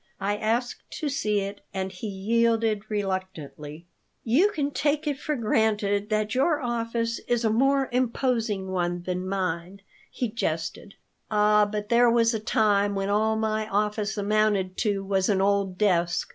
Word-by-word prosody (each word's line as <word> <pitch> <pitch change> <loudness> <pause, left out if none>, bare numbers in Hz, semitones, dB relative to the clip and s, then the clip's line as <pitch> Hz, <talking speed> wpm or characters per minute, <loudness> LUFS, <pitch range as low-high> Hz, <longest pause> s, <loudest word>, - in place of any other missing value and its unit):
I 205 +1 0
asked 235 +3 -2
to 305 - -2
see 210 -7 0
it, 200 +1 -6
and 190 0 -2
he 190 +4 -7
yielded 220 +1 +1
reluctantly 185 -6 -4 0.4
"You 285 - +4
can 290 -7 -2
take 295 +2 0
it 290 -3 -2
for 300 - -2
granted 210 -3 +1
that 215 -1 0
your 290 +4 +2
office 230 -2 -2
is 240 -1 +1
a 220 - +3
more 270 +4 +2
imposing 235 -5 0
one 175 -1 -1
than 180 +1 -3
mine," 185 0 -3 0.3
he 245 - -2
jested 170 -3 -4 0.3
"Ah, 210 0 +4
but 210 -1 -4
there 240 0 +5
was 230 0 +3
a 220 - -1
time 205 -2 +2
when 195 0 -1
all 220 +2 +2
my 220 0 -1
office 210 +1 -1
amounted 205 -2 +1
to 205 -3 0
was 195 0 +1
an 195 -2 +2
old 195 -1 +1
desk. 175 -4 +1
210 Hz, 160 wpm, -26 LUFS, 195-230 Hz, 0.4 s, there